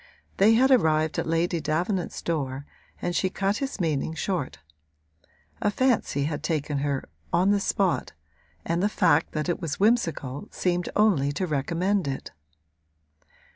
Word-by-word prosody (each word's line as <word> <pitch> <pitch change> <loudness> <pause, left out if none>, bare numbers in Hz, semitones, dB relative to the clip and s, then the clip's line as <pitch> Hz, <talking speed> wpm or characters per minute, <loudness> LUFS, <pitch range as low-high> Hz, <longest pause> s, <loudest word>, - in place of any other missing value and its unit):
They 215 +3 +6
had 260 +3 +4
arrived 155 -10 +3
at - - -2
Lady 165 +1 +1
Davenant's 175 +5 -2
door 140 -4 -2 0.4
and 175 0 -1
she 190 - +1
cut 195 +2 -1
his 270 -5 -4
meaning 160 -2 -1
short. 170 -3 -2 1.0
A 210 - +2
fancy 225 - +1
had 145 0 -2
taken 150 -3 -1
her, 140 -1 -2 0.2
on 185 +3 +3
the 205 - +3
spot, 195 -2 0 0.5
and 170 +1 0
the 205 - +2
fact 160 -5 +2
that 155 -1 -2
it 175 - -1
was 160 -2 -3
whimsical 170 - +1
seemed 175 -1 -1
only 185 -10 +3
to 185 - -1
recommend 170 +5 0
it. 135 -1 -4
170 Hz, 145 wpm, -26 LUFS, 150-195 Hz, 1.0 s, They